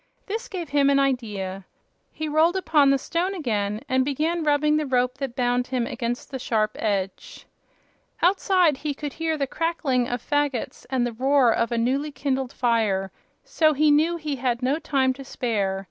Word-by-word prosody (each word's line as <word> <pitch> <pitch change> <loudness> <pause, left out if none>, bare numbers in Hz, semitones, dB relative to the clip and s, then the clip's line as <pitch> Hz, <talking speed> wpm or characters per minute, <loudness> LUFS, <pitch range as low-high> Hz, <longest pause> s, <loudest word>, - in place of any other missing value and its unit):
This 440 +3 -4
gave 350 -6 -6
him 280 -1 +3
an 280 - +4
idea. 210 -8 -1 0.5
He 315 - -4
rolled 315 +4 +3
upon 305 -7 +3
the 275 - +4
stone 345 +7 -2
again 215 - -2
and 260 0 +2
began 310 +5 -1
rubbing 300 0 +2
the 305 -1 -1
rope 250 0 0
that 270 -4 -4
bound 245 0 +1
him 250 -2 -1
against 240 +2 -4
the 265 - -4
sharp 215 -3 0
edge. 195 -3 -3 0.7
Outside 365 -4 +3
he 290 0 -3
could 290 -1 -5
hear 325 -1 -1
the 280 - 0
crackling 275 -5 -1
of 245 0 -2
fagots 290 -1 -2
and 255 -2 +1
the 240 - -3
roar 260 0 +3
of 230 +1 0
a 235 - 0
newly 270 +6 0
kindled 270 -2 -2
fire, 215 -7 0 0.3
so 310 -1 +2
he 300 +1 +3
knew 320 +4 +3
he 300 -4 -4
had 245 -1 -1
no 275 +5 +1
time 270 -5 +1
to 275 +1 -10
spare. 205 -7 -2
270 Hz, 180 wpm, -24 LUFS, 240-300 Hz, 0.7 s, an